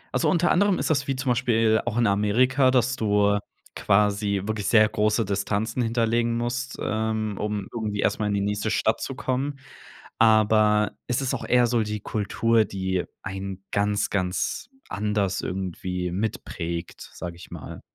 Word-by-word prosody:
Also, - - +2
unter 175 -1 +2
anderem 200 0 +3
ist - - -1
das 135 -3 0
wie 135 - 0
zum 130 0 -1
Beispiel 115 -2 +2
auch 120 0 -1
in 120 - +3
Amerika, 120 +7 +3
dass 125 0 +2
du 105 -3 +2 0.4
quasi 100 -1 +2
wirklich 110 -1 -2
sehr 110 -2 +6
große 110 +1 +1
Distanzen 100 +4 -1
hinterlegen 115 0 +1
musst, 125 +2 -3
ähm, 110 -1 -1
um 105 -2 -3
irgendwie 105 -3 -2
erst - - +1
mal 105 - 0
in 105 - 0
die 100 - 0
nächste 105 +2 -1
Stadt 110 +1 +1
zu 135 - -4
kommen. 135 +1 -2 0.6
Aber 110 -1 +4
es 125 +2 -1
ist 130 - -1
auch - - -5
eher 125 -1 +4
so 120 -1 +1
die 105 0 -4
Kultur, 110 +2 +1
die 95 -2 -2 0.2
einen 95 0 -6
ganz, 100 0 0
ganz 95 - -2 0.2
anders 100 -2 -1
irgendwie 90 -1 -3
mitprägt, 85 -3 -4
sage 85 -1 -6
ich 85 - -13
mal. - - -8
110 Hz, 165 wpm, -25 LUFS, 100-120 Hz, 0.6 s, sehr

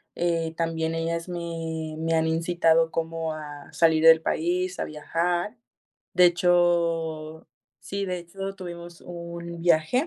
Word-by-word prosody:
Eh, 165 -2 0
también 165 -1 -1
ellas 165 +1 -2
me 165 -2 -4
me 165 +1 -1
han 160 0 +2
incitado 165 0 +2
como 165 -1 -2
a 145 -2 -8
salir 160 -1 +3
del 160 0 +8
país, 180 +3 -1
a - - -1
viajar. 175 +7 -2 0.6
De 180 0 +7
hecho 170 -3 +1 0.3
sí, 200 +3 -4
de 180 -1 -2
hecho, 195 +3 -6
tuvimos 175 -2 -9
un 170 -1 -7
viaje, 170 - +3
165 Hz, 130 wpm, -26 LUFS, 160-175 Hz, 0.6 s, del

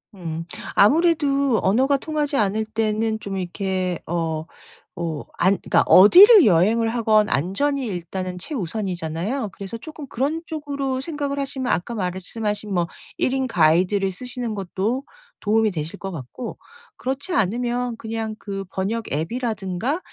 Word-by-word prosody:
음. 165 -3 -5 0.3
아무래도 280 -1 +3
언어가 265 +8 +3
통하지 295 -1 -2
않을 215 +1 +1
때는 220 0 -1
좀 195 -2 -5
이렇게 185 -1 -2
어 160 -2 -2 0.5
뭐 165 -3 -4
안 190 +3 +4
그니까 - - +3
어디를 370 - +9
여행을 215 +5 +4
하건 220 -2 +3
안전이 260 - 0
일단은 185 -3 -4
최우선이잖아요? 190 - -3
그래서 195 +3 -7
조금 310 +3 -9
그런 285 +7 -2
쪽으로 280 -4 -3
생각을 285 -2 -3
하시면 265 -2 -2
아까 175 +8 -2
말씀하신 205 +2 -3
뭐 175 -1 +2 0.3
1 255 - +1
인 265 -1 0
가이드를 185 +2 +3
쓰시는 245 +2 -5
것도 205 +6 -2 0.4
도움이 215 0 +2
되실 165 +3 -5
것 195 0 -6
같고 160 - -7 0.4
그렇지 270 +7 -3
않으면 240 - 0
그냥 220 -1 -4
그 195 -2 -6
'번역 210 +5 -3
앱이라든가 215 - -2
215 Hz, 305 characters per minute, -22 LUFS, 185-260 Hz, 0.5 s, 어디를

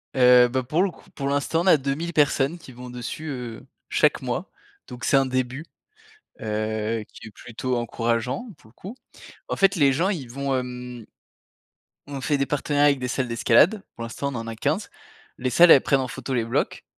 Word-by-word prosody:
Heu, 125 -1 +7
bah, 130 +1 -1
pour 150 +8 0
le 195 - 0
coup - - -20
pour 140 - -4
l'instant, 145 +4 0
on 180 - -2
a 180 - +8
2000 145 +5 -3
personnes 145 +1 +2
qui 160 - -13
vont 125 0 -10
dessus, 125 +6 -6
heu, 125 -5 -6 0.2
chaque - - +2
mois - - -3 0.4
donc, 125 -1 -10
c'est 135 - +3
un 135 - +3
début, 130 +3 -2 0.7
heu, 110 +1 -2
qui 110 - -13
est - - -11
plutôt 125 +4 -4
encourageant 120 - -2
pour 110 - -20
le - - -25
coup, 195 - -10 0.5
en - - -1
fait, 195 0 +4
les 145 -5 +4
gens, 165 +8 +1
ils 150 - -4
vont, 140 +1 -2
hem 125 -2 -6 1.0
on 140 -1 -6
fait 145 +2 +1
des 140 - 0
partenariats 145 0 +1
avec 140 -2 +1
des 125 - -3
salles 130 0 -2
d'escalade, 120 - +3
pour 115 - -7
l'instant 115 +4 -4
on - - -7
en 115 - -5
a 115 - -5
15. 110 - -1 0.5
Les 130 - -1
salles, 170 +7 +7
elles 135 - +8
prennent 140 - +2
en 130 - -3
photo 135 +2 -6
les 115 -2 0
blocs 115 - -2
130 Hz, 205 wpm, -24 LUFS, 120-145 Hz, 1.0 s, a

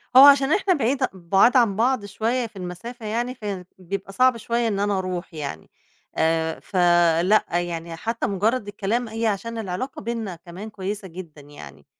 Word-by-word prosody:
هو 260 - +11
عشان 280 +1 +6
إحنا 395 -1 +3
بعيد 265 -2 0
بُعاد 190 +7 +3
عن 230 -5 +3
بعض 240 0 +1
شوية 230 +5 -1
في 220 - -25
المسافة 195 +6 -7
يعني، 240 +4 -2
فيعني 195 -6 -5
بيبقى 195 +2 -6
صعب 255 +3 +4
شوية 235 +1 -1
إن 205 -3 -1
أنا 205 -1 +1
أروح 185 -1 -4
يعني 140 - -6 0.5
آآ، 160 0 +1
فلأ، 175 +1 +3
يعني 170 -1 -2
حتّى 225 +7 -2
مُجرّد 210 +3 0
الكلام 215 +4 -2
هي 225 +1 -2
عشان 230 +3 -2
العلاقة 220 +5 -4
بيننا 225 -4 -4
كمان 175 +5 -9
كويسة 200 -1 -5
جدًا 165 -4 -10
يعني، 75 - -13
200 Hz, 165 wpm, -23 LUFS, 175-230 Hz, 0.5 s, هو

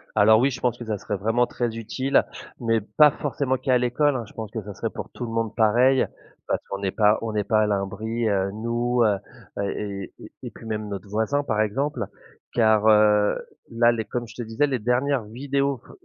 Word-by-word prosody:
Alors 110 +1 +6
oui 135 +3 +3
je 125 - -6
pense 125 -3 0
que 120 - -8
ça 110 -1 -2
serait 100 +1 -4
vraiment 115 +5 +2
très 120 -2 -3
utile, 130 +5 +1 0.3
mais 115 -2 +1
pas 150 +8 +5
forcément 135 -2 -1
qu'à 130 0 +2
l'école, 125 +4 +1
hein. 120 - -2
Je - - -17
pense 110 -2 -7
que 110 -2 -4
ça 105 0 -8
serait - - -3
pour - - -7
tout 125 - -6
le 115 - -6
monde 115 -1 -2
pareil 125 +4 +4 0.4
parce - - 0
qu'on 100 - -4
n'est 100 -1 -1
pas 105 +1 +3
on 115 -1 -3
n'est 105 -1 0
pas 110 +1 +2
à - - +1
l'abri, 105 +3 -2
heu, 100 -1 0
nous, 120 +2 0
heu, 105 -3 +3 0.5
et 100 0 -4
et - - -11
et - - -11 0.2
et - - -7
puis - - -13
même 110 -1 -3
notre 100 0 -6
voisin 110 +8 0
par 110 -6 0
exemple, 135 +8 -1 0.5
car, 110 -2 +3
heu, 105 -1 +5 0.3
là 120 0 +4
les 115 -2 -2
comme 120 -1 -4
je - - -13
te - - -5
disais 115 +6 0
les 130 -3 -1
dernières 125 +3 +1
vidéos 140 +4 -1
f - - -18
115 Hz, 225 wpm, -24 LUFS, 105-125 Hz, 0.5 s, Alors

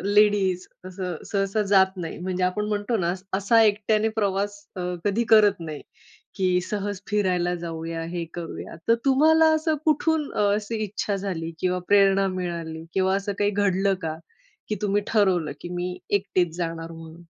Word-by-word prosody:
Ladies 200 -3 +3 0.2
असं 180 -3 -5
सहसा 200 +1 +1
जात 190 0 +5
नाही. 165 -3 -5
म्हणजे 185 +1 -3
आपण 185 +3 0
म्हणतो 210 +2 -1
ना, 175 -3 0 0.3
असा 215 +3 +4
एकट्याने 215 +1 +2
प्रवास 200 0 0 0.2
अ, 185 - -4 0.2
कधी 210 +4 +1
करत 205 -3 +5
नाही 155 -3 -6 0.5
की 185 -2 +2
सहज 205 -2 -3
फिरायला 180 -4 +1
जाऊया, 165 0 -4
हे 170 0 -4
करूया. 170 -1 -7
तर 230 - +6
तुम्हाला 315 +4 +5
असं 315 0 +1
कुठून 310 0 +1
अ, - - -2 0.2
असं 215 +2 -4
इच्छा 210 -1 -2
झाली? 180 -4 -4
किंवा 180 0 +1
प्रेरणा 195 -1 +5
मिळाली 165 -3 -4
किंवा 190 0 +2
असं 200 +1 -2
काही 205 0 +2
घडलं 195 -1 +1
का? 160 -1 -3 0.5
की 215 - 0
तुम्ही 205 0 +1
ठरवलं 190 -7 +2
की 175 - -7
मी 180 +1 -3
एकटीच 185 -4 +1
जाणार 165 -1 -4
म्हणून? 165 +1 -11
195 Hz, 160 wpm, -25 LUFS, 175-210 Hz, 0.5 s, तर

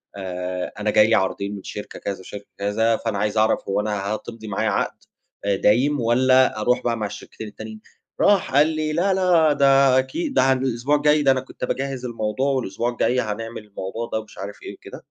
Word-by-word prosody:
"آآ، 90 -1 -4
أنا 105 0 0
جه 105 0 +6
لي 110 +1 +3
عرضين 100 +1 -1
من 95 - -9
شركة 105 - -8
كذا 100 -1 -4
وشركة 100 +2 -9
كذا 110 +3 +1
فأنا 110 -3 -3
عايز 105 +2 -1
أعرَف 110 0 +3
هو 95 - +1
أنا 105 -2 -3
هتمضي 110 +1 -5
معايا 105 +2 -1
عَقد 100 - -1 0.5
آآ، 100 -1 +2
دايم 130 +9 +2
والّا 130 0 +3
أروح 125 +3 +1
بقى 120 -1 0
مع 110 - -2
الشركتين 105 +1 -8
التانيين؟" 110 +1 -9 0.4
راح 195 -9 +3
قال 145 +2 +6
لي: 155 -1 -2
"لا، 190 +4 +2
لا 175 -5 +4
ده 135 -2 +5
أكيد، 275 - -3
ده - - +4
علي 130 0 +3
الأسبوع 125 +5 0
الجاي، 150 +1 +3
ده 135 - +5
أنا 130 - +2
كنت 130 - -7
باجهّز 135 -1 -3
الموضوع 115 +3 -1
والأسبوع 120 -3 -1
الجاي 125 +1 +1
هنعمل 115 0 -5
الموضوع 105 +3 -6
ده." 110 - +1
ومش 110 -1 -13
عارف 100 +1 -8
إيه - - -7
وكده. - - -11
115 Hz, 205 wpm, -22 LUFS, 105-135 Hz, 0.5 s, جه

